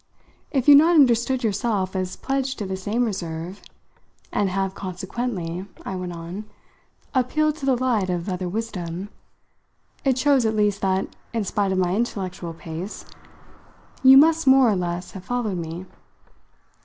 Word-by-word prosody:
If 265 -3 -1
you've 285 -1 +10
not 335 +3 +4
understood 250 -2 +4
yourself 205 -3 0
as 185 -1 -2
pledged 270 -1 -2
to 210 - -4
the 190 0 -3
same 210 +6 -1
reserve, 175 -2 -5 0.7
and 200 - +1
have 195 0 -1
consequently," 185 -1 -4 0.2
I 190 - -4
went 180 -1 -4
on, 170 +5 -7 0.7
"appealed 300 +4 +1
to 275 - -5
the 265 - +4
light 240 -6 0
of 175 0 -2
other 180 -1 -2
wisdom, 190 -3 -4 0.9
it 265 -2 +2
shows 275 -1 +3
at 220 -1 +1
least 205 -1 +1
that, 190 0 +1 0.3
in 225 -2 0
spite 200 0 0
of 190 - 0
my 180 -1 +1
intellectual 185 -6 -3
pace, 165 +5 -7 1.0
you 265 0 +9
must 320 +1 +5
more 265 -3 +6
or - - +1
less 175 0 -3
have 190 - -9
followed 235 -7 -2
me. 165 +2 -6
200 Hz, 155 wpm, -23 LUFS, 185-250 Hz, 1.0 s, you've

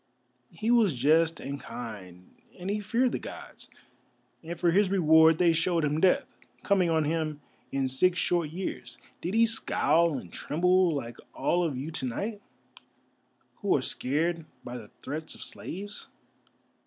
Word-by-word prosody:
He 215 +8 -2
was 220 - +4
just 160 +5 +3
and 140 +1 -5
kind, 100 -7 -9 0.2
and 185 +2 -4
he 210 - -1
feared 235 +5 +1
the - - -2
Gods, - - -10 0.7
and 170 +1 -6
for 170 -1 +3
his 195 +2 +3
reward 160 -3 +5
they 170 -1 +4
showed 165 0 +1
him 150 +2 0
Death, 185 - +4 0.4
coming 190 -4 +3
on 160 -1 +2
him 155 -1 -1 0.3
in 135 -1 0
six 175 +8 +2
short 170 -3 +1
years. 180 +4 -5 0.2
Did 180 +5 -3
he 230 +1 +6
scowl 170 -8 +2
and 90 -9 -9
tremble, 180 +2 +2
like 120 -4 -5 0.2
all 175 0 +1
of 150 -6 -1
you 145 +5 -5
to 155 - -4
night, 205 - -4 1.2
who 200 - +1
are 130 - -3
scared 160 +6 -1 0.2
by 120 - -7
the 110 -4 -9
threats 155 +3 -5
of - - -8
slaves? 205 +3 -6
165 Hz, 155 wpm, -28 LUFS, 145-185 Hz, 1.2 s, he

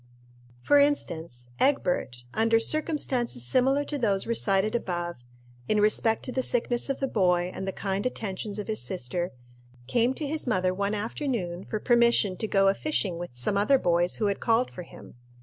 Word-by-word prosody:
For 290 - +5
instance, 165 - -1
Egbert, 180 - 0
under 225 +1 +3
circumstances 255 - 0
similar 265 - +2
to 290 0 -4
those 200 -5 +1
recited 215 -2 +1
above 175 -6 -3 0.5
in 215 - +2
respect 215 +1 +2
to 255 - -3
the 260 - 0
sickness 245 +1 0
of 275 - -2
the 270 - 0
boy, 180 -6 +1
and 190 - -5
the - - 0
kind 195 +1 -3
attentions 210 -4 -4
of 210 - -4
his 220 -1 -2
sister 175 0 -2 0.6
came 240 - +1
to 305 - -3
his 300 0 -3
mother 185 -5 +1
one 200 +2 -1
afternoon 210 - -3
for 215 - -3
permission 235 -5 +3
to 220 - -2
go 195 -1 +3
a 195 - +5
fishing 195 - -1
with 175 - -5
some 125 +12 +1
other 240 +7 +4
boys 175 -4 +1
who 215 - -1
had 200 -1 0
called 230 +2 +1
for 180 - -8
him. 170 - -13
210 Hz, 180 wpm, -27 LUFS, 185-245 Hz, 0.6 s, For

